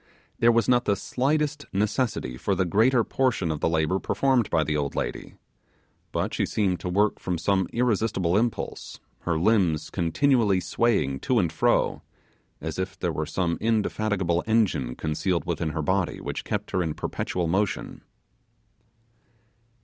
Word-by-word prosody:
There 120 - +5
was 115 0 +2
not 120 -1 +3
the 100 - +2
slightest 145 +6 -1
necessity 105 - -1
for 95 +10 -1
the 95 0 +1
greater 115 +7 +3
portion 120 -12 0
of 75 - -3
the - - +1
labour 80 +3 +1
performed 130 -2 +1
by 80 - +2
the 75 0 -1
old 70 -2 -2
lady: - - -4 0.8
but - - -2
she - - 0
seemed 95 -4 0
to 90 - -4
work 105 +3 +1
from 90 -2 -2
some 95 +2 +1
irresistible 110 -7 +1
impulse; 115 +2 -2 0.2
her 85 -2 -1
limbs 85 -5 +2
continually 100 - +2
swaying 90 - 0
to 125 - 0
and 85 -7 +1
fro, 80 - +1 0.6
as - - -5
if 95 +1 -3
there 90 -3 -2
were 75 +1 -2
some 85 +1 -1
indefatigable 105 -5 0
engine 100 - +1
concealed 80 +2 -1
within 85 -1 -1
her 80 0 -3
body 95 +2 0
which - - -5
kept - - -3
her 90 - +1
in 80 -3 -2
perpetual 90 -2 -2
motion. 95 +5 -1
95 Hz, 155 wpm, -26 LUFS, 85-115 Hz, 0.8 s, There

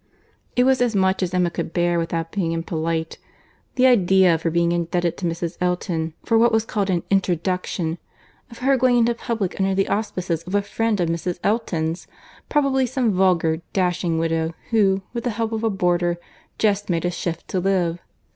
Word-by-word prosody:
It 250 - +4
was 260 0 +3
as 240 -3 +1
much 190 0 +2
as 180 -2 -1
Emma 180 -1 +1
could 170 -1 -4
bear, 175 -1 +1
without 165 0 -3
being 170 -5 -1
impolite. 165 0 -2 0.6
The 255 - +4
idea 190 -7 +5
of 165 - -1
her 165 - 0
being 170 +1 +1
indebted 175 0 0
to 180 - -2
Mrs. 170 0 -4
Elton 170 -3 -1
for 225 -1 +3
what 235 +1 +5
was 225 0 +2
called 205 -3 -1
an 175 -2 0
introduction—of 175 - -3
her 270 +1 +2
going 250 -1 +3
into 235 0 +3
public 225 -5 -3
under 195 0 +1
the 195 0 +1
auspices 185 -6 -2
of 180 +4 -5
a 205 - +2
friend 225 0 -1
of 175 - +1
Mrs. 170 +1 -2
Elton's—probably 230 - -1
some 245 -3 0
vulgar, 175 -4 +2
dashing 180 -3 0
widow, 165 0 -1 0.2
who, 195 -4 +3
with 235 -1 -3
the 245 - 0
help 225 0 -2
of 225 0 -3
a 225 - +2
boarder, 175 -3 +1 0.4
just 205 -2 +1
made 170 -1 0
a 175 - +1
shift 170 -1 -4
to 185 - 0
live! 175 -2 0
180 Hz, 185 wpm, -22 LUFS, 170-215 Hz, 0.6 s, idea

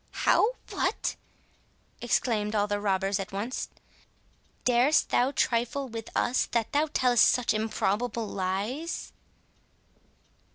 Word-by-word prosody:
"How! 450 +4 +4 0.2
what!" - - -1 0.9
exclaimed 220 -3 0
all 205 -1 +3
the 205 0 -2
robbers 195 -1 0
at 195 +1 -5
once; 210 +6 -4 1.0
"darest 250 +5 +3
thou 250 +2 +3
trifle 260 0 0
with 225 -1 -7
us, 250 - +1
that 230 -2 0
thou 295 +2 +2
tellest 245 -4 +4
such 250 -3 +1
improbable 220 +1 -1
lies?" 205 - -3
230 Hz, 110 wpm, -28 LUFS, 205-250 Hz, 1.0 s, How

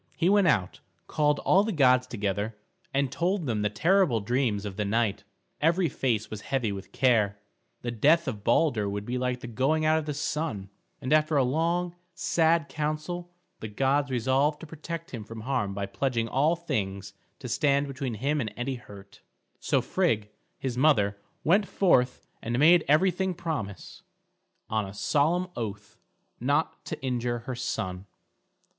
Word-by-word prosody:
He 170 +2 +3
went 200 -2 +4
out, 100 - +1 0.3
called 150 -1 +1
all 195 +2 +4
the 220 - -1
gods 130 -6 +4
together, 105 -1 -2 0.3
and 135 -1 0
told 175 +4 0
them 110 -5 -1
the 105 - +1
terrible 160 - +3
dreams 110 -1 0
of 100 -2 -5
the 105 - -1
night. 105 -1 0 0.4
Every 165 +2 +3
face 115 -5 -1
was 105 -1 -6
heavy 125 -3 -1
with 100 -1 -7
care. 110 -6 +2 0.5
The 120 - -2
death 155 +8 +3
of 105 -6 -4
Balder 115 -4 +2
would 100 +1 -4
be 125 +2 -2
like 125 -1 -1
the - - -6
going 135 +7 +1
out 155 +1 +4
of 155 - -7
the 150 - -2
sun, 145 -9 -3 0.3
and 130 - 0
after 155 0 +3
a 135 - +4
long, 170 +6 0 0.2
sad 165 -2 +2
council 155 +4 -3 0.3
the 110 - -5
gods 135 +6 +1
resolved 135 +4 +1
to - - -7
protect 165 +2 -7
him 115 -4 -6
from 115 +1 -9
harm 110 -5 -1
by 100 0 -2
pledging 115 +4 -1
all 150 +8 +2
things 100 - -3 0.2
to 130 - -8
stand 140 +3 +2
between 135 -3 -4
him 140 +7 0
and 110 -4 -3
any 125 +2 -2
hurt. 100 -3 -14 0.4
So - - +1
Frigg, 105 -2 0 0.3
his 130 -3 -3
mother, 105 -9 +3 0.2
went 195 +5 +3
forth 130 -10 +2 0.2
and 120 +1 -2
made 160 +4 +6
everything 185 +4 +2
promise, 150 - -5 0.7
on 110 -1 0
a 95 0 -8
solemn 160 - +1
oath, 105 -2 -6 0.4
not - - 0
to - - -5
injure 120 -2 -1
her 130 - -3
son. 95 -6 -4
130 Hz, 165 wpm, -27 LUFS, 110-155 Hz, 0.7 s, made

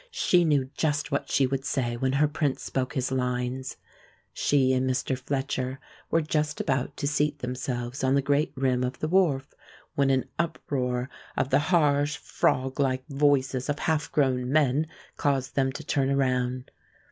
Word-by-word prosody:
She 180 - +3
knew 145 -4 +2
just 150 -1 0
what 140 - -1
she 135 - +3
would 135 +1 -2
say 125 -4 -1
when 130 +2 0
her 150 +2 +4
prince 145 -2 -1
spoke 130 +1 -2
his 130 -1 -1
lines. 125 0 -2 0.6
She 130 -2 +2
and 130 0 +1
Mr. 130 +1 0
Fletcher 130 0 -3 0.3
were 165 0 +2
just 150 -1 -1
about 130 -1 -1
to 140 - -1
seat 150 0 +1
themselves 125 -1 -4
on 130 +1 +3
the 140 - +3
great 145 +1 +1
rim 130 -2 +1
of 125 +1 -2
the 155 - -2
wharf, 155 -7 +2 0.4
when 140 -1 +2
an 130 -1 +2
uproar 130 -7 -1 0.3
of 135 - 0
the 135 - +5
harsh, 150 -4 +3
froglike 130 0 0
voices 135 -2 +1
of 145 - 0
half 155 -1 -1
grown 130 -3 +1
men 150 0 +3 0.3
caused 135 -3 0
them 135 -1 +2
to 155 - -7
turn 135 -2 +1
around. 130 -2 0
135 Hz, 165 wpm, -27 LUFS, 130-145 Hz, 0.6 s, the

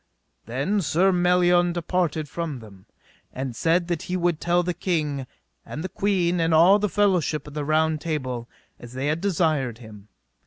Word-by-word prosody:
Then 140 - -1
Sir 180 +4 +2
Melion 175 -1 +3
departed 170 -3 -1
from 160 -1 -4
them, 100 -5 -14 0.4
and 130 -2 -5
said 170 +6 +1
that 175 -3 -2
he 180 - 0
would 175 -3 0
tell 175 +1 +2
the 180 0 -2
king, 150 -7 -2 0.4
and 155 - -7
the 185 - -4
queen, 180 -3 0
and 165 -1 +2
all 180 +6 +6
the 210 0 0
fellowship 180 -7 +1
of 150 - -11
the 150 0 -3
Round 155 +1 +1
Table, 130 -7 -4 0.3
as 120 0 -11
they 130 +2 -3
had 155 +3 -1
desired 155 - 0
him. 105 -3 -13
165 Hz, 170 wpm, -24 LUFS, 140-180 Hz, 0.4 s, all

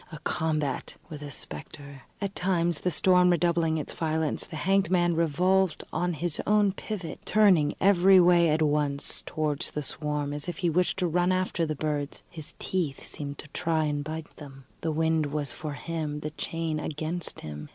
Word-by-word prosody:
A 155 - -7
combat 155 -4 -1
with 150 -2 -8
a 145 - -6
spectre! 140 - -6 0.2
At 200 -1 -2
times 175 -4 +1
the 180 - 0
storm 180 +2 +4
redoubling 170 -2 +2
its 150 - -3
violence, 160 -1 -1
the - - -8
hanged 195 +3 +2
man 175 -2 +2
revolved 180 +3 +2
on 175 0 0
his 165 0 0
own 210 -1 +4
pivot, 190 -2 -6
turning 185 -9 +4
every 190 -1 +6
way 175 -1 +5
at 155 +1 +2
once 145 -2 +1
towards 155 -1 -2
the 150 - -4
swarm, 150 0 -3
as 145 +2 -3
if 175 - -5
he 175 -4 +1
wished 180 +3 +1
to 185 -2 +1
run 175 +2 +2
after 185 -3 0
the 155 - -2
birds; 145 -1 -3
his 160 -4 -7
teeth 165 -8 -2
seemed 140 -1 -6
to - - -9
try 160 +1 0
and 145 -1 -1
bite 155 +1 -7
them. 135 -3 -11 0.2
The 165 - -1
wind 160 0 +1
was 145 0 -2
for 150 -2 -5
him, 150 -1 -4
the 150 - -4
chain 160 0 -3
against 155 +3 -4
him. 75 -1 -7
160 Hz, 185 wpm, -27 LUFS, 150-175 Hz, 0.2 s, every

